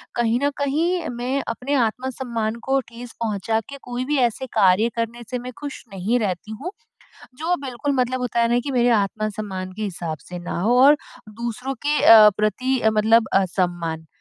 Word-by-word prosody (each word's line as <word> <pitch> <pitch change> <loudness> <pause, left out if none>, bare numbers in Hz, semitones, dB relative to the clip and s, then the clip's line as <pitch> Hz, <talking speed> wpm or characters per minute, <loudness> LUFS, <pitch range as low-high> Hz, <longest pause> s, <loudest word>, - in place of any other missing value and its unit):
कहीं 235 0 +1
न 285 - +3
कहीं 325 +5 0
मैं 260 +3 -1
अपने 250 +5 -3
आत्मसम्मान 235 -2 -3
को 270 0 +4
ठेस 235 0 -9
पहुँचा 220 +1 0
के 280 - -8
कोई 245 +1 -3
भी 295 - +2
ऐसे 260 +4 -7
कार्य 195 +4 +4
करने 230 +1 -3
से 250 -1 -3
मैं 250 +1 -7
खुश 285 -2 -7
नहीं 205 +6 0
रहती 205 -1 -3
हूँ, 360 +4 -4 0.6
जो 330 +6 -1
बिल्कुल 265 +3 -2
मतलब 255 +1 -1
होता 245 -1 -1
है 230 - +3
ना 240 +1 +2
कि 285 - -3
मेरे 245 -1 +3
आत्मसम्मान 200 -2 -4
के 215 +3 -7
हिसाब 170 -6 -4
से 180 - -6
ना 175 0 -4
हो 235 +6 +3
और 290 +2 +7 0.5
दूसरों 245 +3 -3
के 295 0 +2
अ, 215 -2 +9
प्रति 255 +5 0
अ, 220 - +3
मतलब 220 +1 +3
असम्मान, 175 -3 -2
235 Hz, 180 wpm, -22 LUFS, 210-260 Hz, 0.6 s, अ